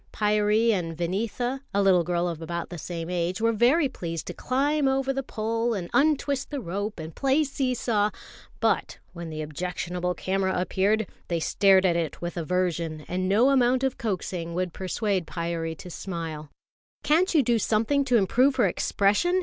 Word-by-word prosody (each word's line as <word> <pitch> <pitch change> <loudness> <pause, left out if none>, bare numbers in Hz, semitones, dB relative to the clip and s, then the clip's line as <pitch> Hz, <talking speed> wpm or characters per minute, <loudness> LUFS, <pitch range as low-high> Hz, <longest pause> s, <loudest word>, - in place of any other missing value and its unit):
Pyârie 210 +2 +2
and 165 -6 -2
Vineetha, 230 +9 -2
a 200 - +4
little 185 -3 +5
girl 175 +1 0
of 165 -2 -4
about 170 +1 -4
the 175 - -6
same 165 +1 -5
age, 180 +1 -1
were 230 +1 +3
very 260 +8 +4
pleased 165 -9 -5
to - - -5
climb 280 +3 +1
over 270 0 +1
the 270 - -1
pole 230 -1 -1
and 175 -3 -5
untwist 285 -2 +2
the 290 - -3
rope 200 0 -4
and 160 0 -7
play 275 +3 +2
see 270 -3 -1
saw; 215 -3 +1 0.5
but - - 0 0.2
when 170 -2 -7
the 155 -1 -4
objectionable 180 +3 -3
camera 190 +1 0
appeared, 200 +4 +1 0.2
they 170 -1 -1
stared 190 +3 +4
at 175 -2 +3
it 165 -2 -2
with 175 0 -5
aversion, 170 -2 -1
and 185 +1 -1
no 230 +7 +4
amount 255 -1 +3
of 265 -1 -1
coaxing 180 -5 -3
would 180 -1 -2
persuade 190 -1 -1
Pyârie 165 -2 -3
to 180 - -9
smile. 165 -5 -5 0.5
"Can't 340 +4 +3
you 295 - +5
do 235 -1 +2
something 230 +7 +1
to 250 -3 +4
improve 250 +7 +3
her 245 -5 +3
expression?" 205 - +2
195 Hz, 175 wpm, -26 LUFS, 175-245 Hz, 0.5 s, little